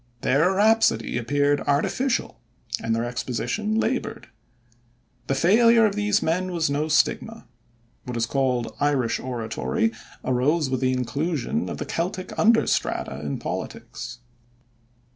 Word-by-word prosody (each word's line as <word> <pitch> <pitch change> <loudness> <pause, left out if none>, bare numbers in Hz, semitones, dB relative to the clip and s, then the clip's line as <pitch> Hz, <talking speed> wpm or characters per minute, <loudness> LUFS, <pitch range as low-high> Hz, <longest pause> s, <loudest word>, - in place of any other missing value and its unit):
Their 160 +8 +3
rhapsody 210 - +3
appeared 145 +4 +1
artificial, 235 - 0 0.4
and 115 0 0
their 115 +1 -1
exposition 125 - -2
labored. 250 +3 -2 1.0
The 135 - +1
failure 230 - +5
of 205 - +1
these 210 0 +1
men 185 +3 0
was 165 -4 0
no 150 +2 0
stigma. 155 - 0 0.6
What 125 -2 -4
is 115 - +1
called 125 -2 0
"Irish 140 -5 +1
oratory" 130 - -1 0.3
arose 130 +4 +1
with 130 - 0
the 130 0 +2
inclusion 150 - -2
of - - -5
the - - -4
Celtic 185 +2 -3
under 225 +1 +5
strata 65 - -1
in 70 -1 -3
politics. 120 +1 -6
145 Hz, 125 wpm, -24 LUFS, 125-205 Hz, 1.0 s, failure